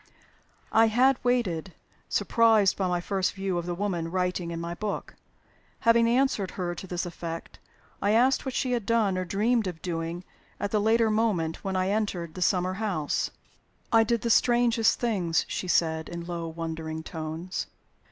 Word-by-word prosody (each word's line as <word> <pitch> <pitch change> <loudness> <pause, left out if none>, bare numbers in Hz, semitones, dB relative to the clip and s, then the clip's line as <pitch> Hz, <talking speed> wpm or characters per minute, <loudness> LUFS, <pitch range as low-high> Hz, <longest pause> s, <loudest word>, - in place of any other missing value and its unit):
I 225 +1 +5
had 255 +4 +3
waited, 195 -9 0 0.3
surprised 225 -4 +3
by 190 - 0
my 180 -1 0
first 190 +1 -1
view 190 -2 -2
of 170 - -6
the 175 - -2
woman 175 -4 -2
writing 180 -1 -1
in 165 0 -4
my 170 0 -4
book. 205 +3 -4 0.7
Having 230 -1 +5
answered 235 -5 +2
her 175 -2 -2
to 190 - -8
this 180 0 -3
effect, 165 -1 -7 0.4
I 200 - +1
asked 245 +5 +4
what 265 - -4
she 255 - 0
had 235 -5 -1
done 220 -5 +2
or 185 0 -2
dreamed 220 +4 +1
of 175 -3 -5
doing 170 0 -3 0.4
at 205 - -2
the 210 - +2
later 225 +1 +3
moment 205 -8 0
when 195 -1 -2
I 185 0 +1
entered 195 -6 -1
the 185 - -7
summer 185 0 +2
house. 175 -9 -1 0.6
"I 225 -1 +6
did 230 0 0
the 235 - 0
strangest 235 -1 +3
things," 190 -9 +1
she 185 - -4
said, 160 -2 +1
in 170 0 -6
low, 170 -1 -4
wondering 160 -1 -5
tones. 160 +3 -5
190 Hz, 170 wpm, -27 LUFS, 170-225 Hz, 0.7 s, I